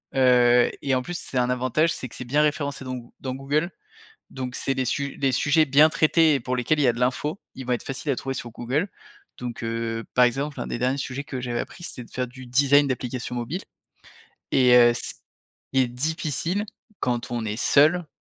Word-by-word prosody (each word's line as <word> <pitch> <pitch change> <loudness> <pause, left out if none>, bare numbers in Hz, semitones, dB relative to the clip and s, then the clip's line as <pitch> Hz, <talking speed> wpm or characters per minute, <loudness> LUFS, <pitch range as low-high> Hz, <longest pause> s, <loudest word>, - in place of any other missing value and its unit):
heu, 125 -2 +5
et 135 -2 +1
en 130 - +1
plus, 175 +6 -5
c'est 130 - -4
un 125 0 +2
avantage. 130 +6 +1
C'est 130 - -5
que - - -12
c'est 125 - -6
bien 145 +5 +1
référencé 145 -2 -1
dans 130 0 -4
Goo 120 -1 -10
dans 130 -1 -4
Google, 150 +6 -1 0.6
donc 125 -1 -6
c'est 135 - -1
des 130 -1 -1
su 140 +2 -2
des 135 -2 +1
sujets 150 +5 +3
bien 145 +3 +6
traités 160 -1 +3
et 135 - 0
pour 125 +1 -2
lesquels 125 +5 +1
il - - +2
y 130 - +4
a - - +4
de 120 - -7
l'info. 145 +7 -1
Ils 130 - -7
vont 125 - -1
être 120 - -1
faciles 135 +2 -4
à 130 - +1
trouver 135 0 -4
sur 120 - -6
Google, 135 - -2 0.5
donc 120 -2 -6
heu, 115 0 -3
par 125 0 +6
exemple, 140 +4 -2
un - - -3
des - - -4
derniers 130 +3 0
sujets 135 +1 -4
que 130 -3 -5
j'avais 120 -1 -2
appris 175 - -8
c'était 125 - -6
de - - -19
faire 125 0 -2
du 130 +1 -12
design 140 +3 +4
d'applications 125 -2 -3
mobiles 125 +10 -4 0.9
et 125 -2 +4
heu, 120 -1 +8
s 120 - -3 0.6
il 130 - +5
est - - +1
difficile 160 - -2 0.3
quand 120 -1 -1
on 120 -2 -2
est 105 +1 -3
seul, 155 +7 +4
130 Hz, 225 wpm, -24 LUFS, 125-145 Hz, 0.9 s, heu